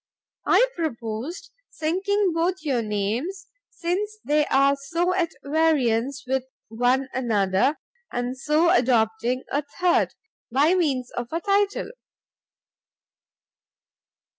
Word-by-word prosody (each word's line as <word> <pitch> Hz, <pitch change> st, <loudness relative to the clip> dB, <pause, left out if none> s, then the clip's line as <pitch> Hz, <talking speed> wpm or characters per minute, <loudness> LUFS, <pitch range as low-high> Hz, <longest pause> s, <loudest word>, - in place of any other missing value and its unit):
I -, -, +5 dB
proposed 250 Hz, -, -4 dB, 0.2 s
sinking 380 Hz, +5 st, 0 dB
both 340 Hz, +1 st, 0 dB
your 265 Hz, -6 st, 0 dB
names, 225 Hz, -, -2 dB, 0.2 s
since 395 Hz, +5 st, -3 dB
they 295 Hz, 0 st, +2 dB
are 275 Hz, +1 st, +4 dB
so 335 Hz, +6 st, -1 dB
at 355 Hz, -3 st, +1 dB
variance 280 Hz, -5 st, +1 dB
with 260 Hz, 0 st, -1 dB, 0.2 s
one 245 Hz, +4 st, +1 dB
another, 220 Hz, +1 st, +1 dB, 0.3 s
and 245 Hz, +1 st, -2 dB
so 305 Hz, +5 st, +2 dB
adopting 240 Hz, -3 st, +2 dB
a 285 Hz, -, +1 dB, 0.2 s
third, 360 Hz, -1 st, +2 dB, 0.4 s
by 290 Hz, +7 st, +4 dB
means 280 Hz, -9 st, 0 dB
of 240 Hz, -1 st, -4 dB
a 330 Hz, -, -1 dB
title. 405 Hz, +3 st, 0 dB
280 Hz, 105 wpm, -24 LUFS, 245-345 Hz, 0.4 s, I